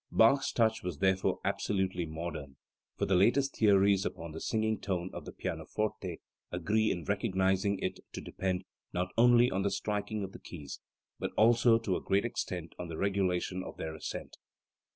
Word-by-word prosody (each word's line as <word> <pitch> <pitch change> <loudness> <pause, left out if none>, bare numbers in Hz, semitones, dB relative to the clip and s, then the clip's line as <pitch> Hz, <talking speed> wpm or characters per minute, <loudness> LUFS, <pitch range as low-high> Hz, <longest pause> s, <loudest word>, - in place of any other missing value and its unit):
Bach's 135 +5 +5
touch 110 -1 +2
was 90 -5 -4
therefore 95 +2 +2
absolutely 95 -4 0
modern, 80 -4 -6 0.4
for - - +1
the 95 - +1
latest 120 +9 +3
theories 100 -2 +4
upon 85 -5 -5
the 80 - -7
"singing 110 -1 0
tone" 95 -3 -2
on - - -7
the - - -7
pianoforte 100 -5 -3 0.3
agree 105 +6 +1
in 85 - -2
recognising 95 +4 +1
it 95 - -3
to - - -5
depend 95 -1 -2 0.3
not 90 +1 -1
only 120 +1 +6
on 95 +1 0
the 100 - +1
striking 105 +1 -2
of 95 - -5
the - - -11
keys, 75 -6 -8 0.4
but - - -2
also, 115 +1 +6
to 110 -5 -1
a - - -2
great 100 +3 +1
extent, 90 -7 -4
on 90 - -4
the 80 -1 -6
regulation 95 -1 0
of - - -8
their 80 0 -4
ascent. 80 - -6
95 Hz, 175 wpm, -31 LUFS, 90-110 Hz, 0.4 s, only